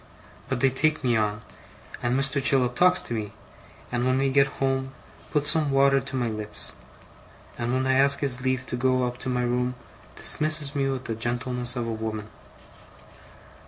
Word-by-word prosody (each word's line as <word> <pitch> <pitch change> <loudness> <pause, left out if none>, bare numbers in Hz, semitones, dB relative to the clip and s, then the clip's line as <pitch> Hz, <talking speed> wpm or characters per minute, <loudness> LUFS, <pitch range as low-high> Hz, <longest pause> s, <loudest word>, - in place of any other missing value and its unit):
But 130 -2 -1
they 135 0 +4
take 155 +3 +1
me 120 -2 +2
on; 105 0 -1 0.6
and 120 +2 +1
Mr. 135 0 0
Chillip 130 -3 +3
talks 180 +6 +4
to - - -6
me; 105 -2 -4 0.6
and 120 0 0
when 130 +1 +2
we 135 0 +1
get 140 0 +4
home, 135 0 -1 0.4
puts 150 0 +2
some 155 -3 +1
water 135 0 +4
to 135 +1 -7
my 125 -2 0
lips; 105 -1 -6 0.8
and 120 0 -2
when 130 +1 0
I 130 - +2
ask 140 +1 +4
his 130 -3 -2
leave 130 0 -1
to 125 - -4
go 130 0 +1
up 125 0 -5
to 130 - -4
my 125 -1 0
room, 125 +1 0 0.4
dismisses 155 -2 +2
me 135 -1 +1
with 130 -1 -3
the 115 - -2
gentleness 120 +2 -2
of 120 -2 -2
a - - -2
woman. 110 -1 -4
130 Hz, 185 wpm, -25 LUFS, 120-135 Hz, 0.8 s, they